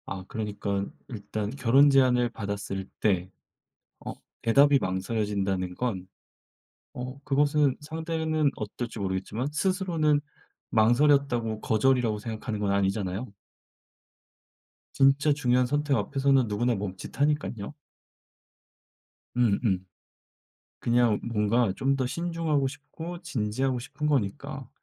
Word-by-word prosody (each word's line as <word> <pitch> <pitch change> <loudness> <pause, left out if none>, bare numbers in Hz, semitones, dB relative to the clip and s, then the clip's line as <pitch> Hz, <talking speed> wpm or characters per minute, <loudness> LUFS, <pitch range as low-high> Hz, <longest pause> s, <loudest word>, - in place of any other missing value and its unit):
아 95 -1 -6
그러니깐 100 -2 -3 0.2
일단 105 -2 -4
결혼 135 +2 +5
제안을 125 -3 +4
받았을 100 -3 -4
때 95 -4 +1 0.8
어 - - -4 0.3
대답이 140 +4 +5
망설여진다는 95 -2 -1
건 95 -7 -3 0.9
어 125 +2 -6
그것은 145 0 +2
상대는 160 -1 -1
어떨지 110 +2 -5
모르겠지만 100 +6 -2
스스로는 170 -5 +1 0.5
망설였다고 120 -1 +3
거절이라고 115 -1 +2
생각하는 110 0 -5
건 100 -1 0
아니잖아요. 100 +2 -1 1.6
진짜 135 +2 +4
중요한 125 -3 +2
선택 145 +1 +1
앞에서는 135 -3 +2
누구나 115 +4 0
멈칫하니깐요. 110 +5 -2 1.6
음 115 -5 +3
음. 95 -5 0 0.9
그냥 120 -2 +2
뭔가 115 0 +1
좀 135 +4 +1
더 130 -1 -1
신중하고 165 -1 -1
싶고 160 +5 -8
진지하고 125 +3 -1
싶은 140 +5 -6
거니까 120 -10 -2
120 Hz, 265 characters per minute, -27 LUFS, 105-140 Hz, 1.6 s, 결혼